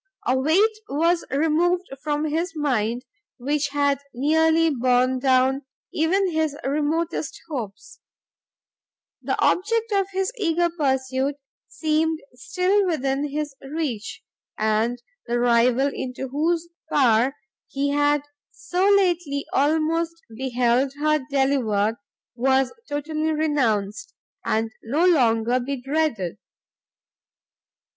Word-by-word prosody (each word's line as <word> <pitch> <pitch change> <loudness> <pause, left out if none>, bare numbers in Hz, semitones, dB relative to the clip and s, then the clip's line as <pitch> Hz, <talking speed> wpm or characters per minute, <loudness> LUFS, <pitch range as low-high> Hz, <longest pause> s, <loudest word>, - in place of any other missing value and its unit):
A 255 - +2
weight 350 +12 +3
was 335 +4 +1
removed 325 +5 +2 0.2
from 300 0 -1
his 330 +3 -2
mind 250 -5 -1 0.3
which 285 +3 -1
had 285 -1 +1 0.2
nearly 320 +4 +3
borne 255 0 +2
down 260 +1 +3 0.3
even 365 +4 +1
his 315 -3 -1
remotest 305 +3 -1
hopes; 235 -11 -7 1.2
the - - -2
object 455 +4 +1
of 395 -2 +2
his 385 +3 -1
eager 345 -2 +1
pursuit 265 -3 0 0.3
seemed 315 0 0
still 370 +10 +1
within 280 -3 -1
his 295 0 -3
reach, 275 -6 -4 0.3
and 220 +3 0 0.2
the 240 +1 0
rival 245 +3 +3
into 255 +1 -5
whose 325 +5 0 0.2
power 250 0 +3 0.3
he 280 +1 -1
had 290 0 +2 0.3
so 370 +3 0
lately 350 -8 +2
almost 320 +3 +1 0.2
beheld 250 +1 +1
her 305 +1 +1
delivered, 240 -6 +1 0.4
was 265 +1 +1 0.2
totally 310 +2 -1
renounced, 270 - -1 0.3
and 220 +1 0
no 290 +10 +1
longer 240 -7 +3
to - - -5
be 275 +1 -3
dreaded. 270 - -1
285 Hz, 105 wpm, -23 LUFS, 255-320 Hz, 1.2 s, weight